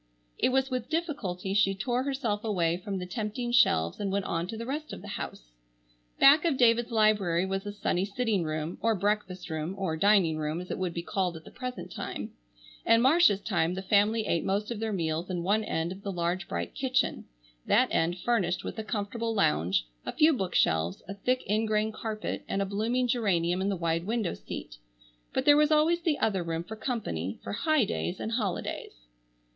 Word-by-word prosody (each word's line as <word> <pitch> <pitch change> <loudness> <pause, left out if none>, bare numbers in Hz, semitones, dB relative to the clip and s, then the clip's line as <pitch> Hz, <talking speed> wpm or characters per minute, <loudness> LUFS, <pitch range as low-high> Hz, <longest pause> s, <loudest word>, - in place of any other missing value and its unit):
It - - +3
was 265 +1 +1
with 250 -2 -3
difficulty 275 - -2
she 195 -1 +3
tore 240 +5 -1
herself 260 -6 -2
away 175 -6 +1
from 195 +1 -4
the 180 - -4
tempting 220 +4 -3
shelves 85 - +3
and 200 -2 -1
went 200 -1 -1
on 170 +1 -2
to 220 - -6
the 230 - -5
rest 300 +4 -4
of - - -8
the - - -8
house. - - -6 0.7
Back 290 +3 +7
of 325 -6 +1
David's 235 -1 +4
library 210 -6 +2
was 195 +1 -3
a - - -3
sunny 190 -3 -1
sitting 205 -2 0
room, 155 +1 -3
or 225 -1 +2
breakfast 190 -3 -2
room,—or 160 +2 -2
"dining 190 -4 +4
room" 155 +1 -2
as 180 - -7
it - - -3
would 180 -2 -2
be 170 - -3
called 180 -2 -1
at 160 - -13
the - - -12
present 250 -1 -6
time. - - -5 0.5
In 230 - +5
Marcia's 260 - +5
time 175 -5 0
the 190 - -5
family 210 +3 +3
ate 170 - 0
most 205 +4 -1
of 230 - -3
their 225 0 -2
meals 165 -2 -2
in 175 -2 -2
one 210 +4 +2
end 165 -4 -2
of 190 +1 -8
the 200 - -4
large 175 0 -2
bright - - -4
kitchen, 260 -1 0 0.4
that - - +4
end 170 +2 +1
furnished 185 -4 0
with - - -5
a - - -3
comfortable 225 +1 -3
lounge, 80 - +2 0.2
a - - -4
few 310 +1 +5
bookshelves, 90 - +1
a 195 - -5
thick 250 +6 -1
ingrain 215 +1 +1
carpet, 215 0 -4
and 195 - -1
a 200 - +1
blooming 225 +6 0
geranium 185 -7 +1
in 195 - 0
the 200 - 0
wide 165 0 -1
window 220 -4 0
seat. - - -8 0.5
But - - -1
there 290 - +8
was 300 0 +4
always 315 +3 +3
the 320 -3 +1
other 195 -4 +1
room 165 -1 -3
for 220 +5 -8
company, 195 - -3
for - - -5
"high 300 +3 +2
days 190 -3 -3
and 220 - -3
holidays." 195 - -3
200 Hz, 200 wpm, -29 LUFS, 175-230 Hz, 0.7 s, there